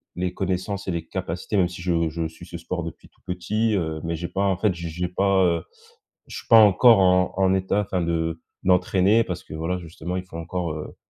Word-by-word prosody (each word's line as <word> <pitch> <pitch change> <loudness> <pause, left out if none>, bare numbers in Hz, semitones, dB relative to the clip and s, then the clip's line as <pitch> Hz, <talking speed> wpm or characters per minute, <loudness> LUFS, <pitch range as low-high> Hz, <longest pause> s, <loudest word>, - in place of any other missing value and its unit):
les 90 0 -2
connaissances 95 +1 -3
et - - 0
les 85 -1 -4
capacités 90 +3 -3
même 90 - +4
si 85 0 -9
je 85 -2 +1
je 80 +1 -3
suis 80 +2 -13
ce 85 -1 -8
sport 85 +1 -4
depuis 85 - -9
tout - - -35
petit, 105 +5 -1
heu, 80 -4 -2
mais 85 0 -2
j'ai 85 +2 -4
pas 100 +1 -2
en 95 -2 +1
fait 100 -2 +1
j'ai 85 -1 -5
j'ai 90 +2 -3
pas, 95 +1 +2
heu 85 -2 +1 0.6
je - - -8
suis - - -10
pas 115 - +8
encore 110 +2 +7
en 90 -1 +3
en 95 0 +3
état, 95 +2 0
enfin 95 -2 -2
de 80 -1 -1 0.2
d'entraîner. 95 +4 +3
Parce 90 -5 -5
que - - -9
voilà, 85 +3 -2
justement 85 +1 -6
il 90 - -4
faut 85 - -9
encore, 85 0 -3
heu 75 - -7
90 Hz, 235 wpm, -24 LUFS, 85-95 Hz, 0.6 s, pas